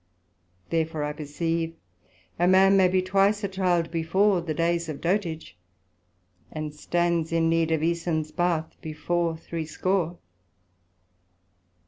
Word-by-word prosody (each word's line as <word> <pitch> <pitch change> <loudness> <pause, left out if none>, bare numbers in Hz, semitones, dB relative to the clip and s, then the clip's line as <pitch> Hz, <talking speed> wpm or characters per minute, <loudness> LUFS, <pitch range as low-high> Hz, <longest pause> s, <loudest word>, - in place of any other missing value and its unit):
Therefore 160 -2 0
I 150 0 -2
perceive 165 +2 -3 0.6
a 175 - +3
man 190 +1 +6
may 190 -1 +5
be 185 0 +1
twice 200 +3 +2
a - - +1
Child 180 -3 0
before 180 +4 +2
the 160 -2 -4
days 170 0 0
of 150 - -5
dotage; 170 - -2 1.0
and 155 -1 -5
stands 170 +1 0
in 165 0 +2
need 165 -1 +2
of 160 -2 +1
Æsons 160 -2 -1
Bath 175 -3 0
before 165 +1 -2
threescore. 170 +2 -2
170 Hz, 120 wpm, -26 LUFS, 160-180 Hz, 1.0 s, man